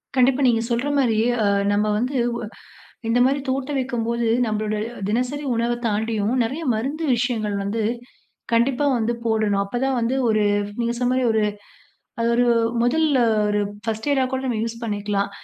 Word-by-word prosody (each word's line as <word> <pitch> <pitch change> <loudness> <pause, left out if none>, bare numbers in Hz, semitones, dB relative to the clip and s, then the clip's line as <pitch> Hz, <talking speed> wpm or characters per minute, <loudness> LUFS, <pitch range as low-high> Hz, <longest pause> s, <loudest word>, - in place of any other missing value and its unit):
கண்டிப்பா, 260 +1 +3
நீங்க 225 -2 +3
சொல்ற 240 +4 0
மாரி 235 -5 +2 0.3
அ - - +2 0.3
நம்ம 205 +1 +2
வந்து 255 +5 -1 0.2
ஒ - - -5 0.7
இந்த 230 +2 +2
மாரி 275 +2 +2
தோட்டம் 270 +2 -1
வைக்கும்போது, 235 -2 -1 0.2
நம்மளோட 215 -1 -1 0.3
தினசரி 250 +7 -1
உணவை 235 +1 0
தாண்டியும் 220 +1 0
நெறைய 270 +9 -3
மருந்து 275 +9 -2
விஷயங்கள் 225 -4 -1
வந்து, 210 +3 -2 0.7
கண்டிப்பா 250 +4 +2
வந்து 230 +1 0
போடணும். 215 -3 +1
அப்போதான் 255 +5 -1
வந்து, 235 +3 0
ஒரு 215 -1 +2 0.4
நீங்க 235 0 0
சொன்ன 250 0 +1
மாரி 255 0 +1
ஒரு 220 - +2 0.8
அது 230 - +1
ஒரு 245 - +3 0.4
முதல்ல 290 +3 +2 0.3
ஒரு 210 0 +1 0.2
ஃபர்ஸ்ட் 220 +3 -3
எய்டா 270 -2 +3
கூட 260 0 -1
நம்ம 245 -4 -1
யூஸ் 230 0 -5
பண்ணிக்கலாம். 205 -2 -1
235 Hz, 155 wpm, -22 LUFS, 220-260 Hz, 0.8 s, கண்டிப்பா